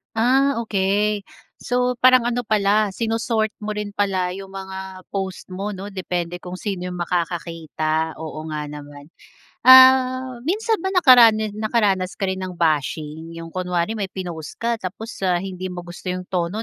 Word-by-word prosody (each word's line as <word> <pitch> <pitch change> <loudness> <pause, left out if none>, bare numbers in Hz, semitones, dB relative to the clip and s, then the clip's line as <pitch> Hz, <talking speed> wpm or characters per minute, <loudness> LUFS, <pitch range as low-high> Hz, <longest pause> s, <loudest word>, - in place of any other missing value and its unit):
Ah, 270 +5 +3
okey. 205 0 0 0.3
So, 250 0 -1
parang 255 -1 +6
ano 240 0 0
pala 210 0 +3
sino-sort 225 -1 0
mo 210 0 -4
rin 210 -1 -4
pala 190 -3 0
'yong 195 +1 -7
mga 190 -1 -8
post 190 -1 -5
mo, 200 +2 -4
'no? 200 +2 -7
Depende 175 -2 -3
kung 180 0 -8
sino 185 -2 -4
'yong 180 - -5
makakakita. 165 -2 -2
Oo 155 0 -7
nga 150 -1 -4
naman. 145 +1 -10 0.6
Ah, 260 -1 +7
minsan 440 +4 0
ba 380 - -5
nakarana 230 - +6
nakaranas 205 -3 0
ka 195 -1 -2
rin 190 - -3
ng 180 - -7
bashing? 160 0 -1
'Yong 165 0 -8
kunwari 180 +4 -2
may 200 - -1
pinost 175 -5 -7
ka 235 0 -2
tapos, 215 +4 -6 0.2
ah, 180 0 +1
hindi 185 -1 -5
mo 180 -1 -6
gusto 175 +2 -11
'yong 180 0 -2
tono 180 +4 -1
190 Hz, 160 wpm, -22 LUFS, 175-220 Hz, 0.6 s, Ah